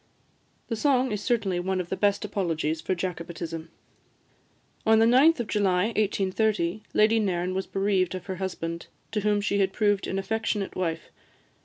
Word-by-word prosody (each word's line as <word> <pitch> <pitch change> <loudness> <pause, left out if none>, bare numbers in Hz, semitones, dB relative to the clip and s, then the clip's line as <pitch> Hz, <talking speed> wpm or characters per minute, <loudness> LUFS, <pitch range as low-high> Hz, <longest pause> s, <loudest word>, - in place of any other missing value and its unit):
The 230 - -2
song 260 +1 +2
is 210 -1 -2
certainly 205 -6 0
one 190 +1 -1
of 175 -1 -4
the - - -1
best 205 +1 +1
apologies 165 -6 -1
for 185 - -1
Jacobitism. 170 -2 -5 1.1
On 220 0 +5
the 225 - +5
9th 270 +7 +5
of - - -3
July 190 -4 +2
1830, 210 -2 0
Lady 220 +1 +4
Nairn 185 -3 -1
was 190 +1 -2
bereaved 195 -2 0
of 180 -1 -7
her 190 -2 -5
husband, 170 -3 -4 0.2
to 220 - 0
whom 210 0 +1
she 200 0 0
had 190 -1 +2
proved 205 -2 +1
an 190 - -2
affectionate 210 0 -2
wife. 165 -3 -3
195 Hz, 165 wpm, -26 LUFS, 180-215 Hz, 1.1 s, On